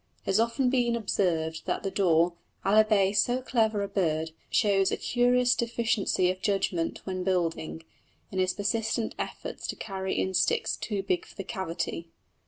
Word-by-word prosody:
It - - -36
has 195 +2 +2
often 235 +3 +2
been 240 -2 +2
observed 165 -7 -1
that - - -1
the 195 - -2
daw, 170 -3 +3 0.3
albeit 205 -1 +4
so 245 +1 +2
clever 220 -5 +1
a - - -2
bird, 160 -5 0 0.2
shows 195 -2 +3
a - - 0
curious 245 0 +3
deficiency 225 -6 +1
of 185 0 -8
judgment 190 -4 0
when 185 -1 -3
building, 170 -3 -1 0.5
in 190 - -2
his 185 0 +2
persistent 225 +2 -1
efforts - - -5
to - - -3
carry 190 -2 -4
in 190 - 0
sticks - - +2
too 205 -3 -3
big 180 -3 -1
for - - -16
the 195 - -5
cavity. 170 -2 -4
195 Hz, 165 wpm, -28 LUFS, 180-225 Hz, 0.5 s, albeit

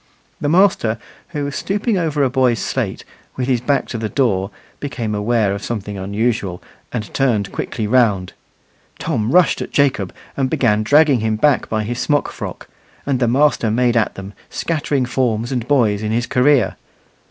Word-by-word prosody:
The 145 - 0
master, 165 - +3 0.3
who 150 -3 -4
was 140 0 -4
stooping 205 +3 -1
over 155 -5 0
a 135 - +3
boy's 130 -3 +2
slate, - - -3 0.3
with 125 -1 -2
his 125 -3 +1
back 140 +3 0
to 115 - -4
the 110 -1 -2
door, 100 -8 +1 0.3
became 120 -6 -3
aware 105 -1 +1
of 100 0 -5
something 105 -3 -4
unusual, 100 -1 -1 0.3
and 110 -4 -5
turned 110 -8 +1
quickly 110 - -3
round. 105 -5 +2 0.6
Tom 120 -8 -1
rushed 180 +1 +4
at - - -4
Jacob, 130 -10 +1 0.2
and 135 -2 0
began 120 -8 +2
dragging 145 +3 +4
him 110 0 0
back 140 +5 +2
by 110 -1 0
his 120 +3 -4
smock 145 -1 +1
frock, - - -7 0.4
and 135 -3 0
the 120 - +2
master 135 -2 +2
made 120 +2 +2
at 115 -2 +1
them, 95 +1 -8 0.2
scattering 145 -5 -1
forms 120 -2 -1
and 125 -2 -2
boys 115 -8 +2
in 110 0 -2
his 120 +2 0
career. 125 -4 +2
120 Hz, 175 wpm, -19 LUFS, 110-140 Hz, 0.6 s, rushed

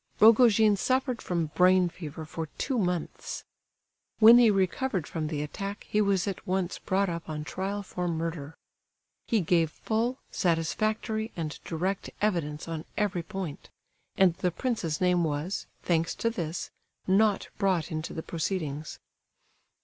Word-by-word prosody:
Rogojin 220 -2 +6
suffered 255 +2 0
from 170 -4 -2
brain 185 0 +5
fever 160 -2 -7
for 160 +1 -5
two 260 -4 0
months. 180 -4 -2 0.7
When 230 +2 +9
he 235 -2 +7
recovered 195 - 0
from 160 -2 -3
the 150 -1 -2
attack 195 +7 -6
he 210 - +2
was 200 -2 +2
at 195 - -5
once 185 -1 -1
brought 195 +1 +1
up 170 -2 -5
on 150 -1 -3
trial 195 +6 -3
for 180 -2 -4
murder. 160 -2 -3 0.7
He 225 -3 +2
gave 165 -1 +2
full, 230 +9 -1
satisfactory, 215 +6 0
and 160 -2 -4
direct 185 +4 -2
evidence 165 -8 -1
on 165 -1 -4
every 205 -4 0
point; 185 -4 -6 0.5
and 190 -3 +5
the 180 - +1
prince's 175 - -2
name 180 -1 +3
was, 155 +4 -2 0.2
thanks 165 -1 +1
to 230 - 0
this, 170 -5 -4 0.3
not 200 +2 +3
brought 185 -5 +1
into 155 0 -3
the 160 - -5
proceedings. 155 -3 -3
180 Hz, 140 wpm, -28 LUFS, 165-210 Hz, 0.7 s, When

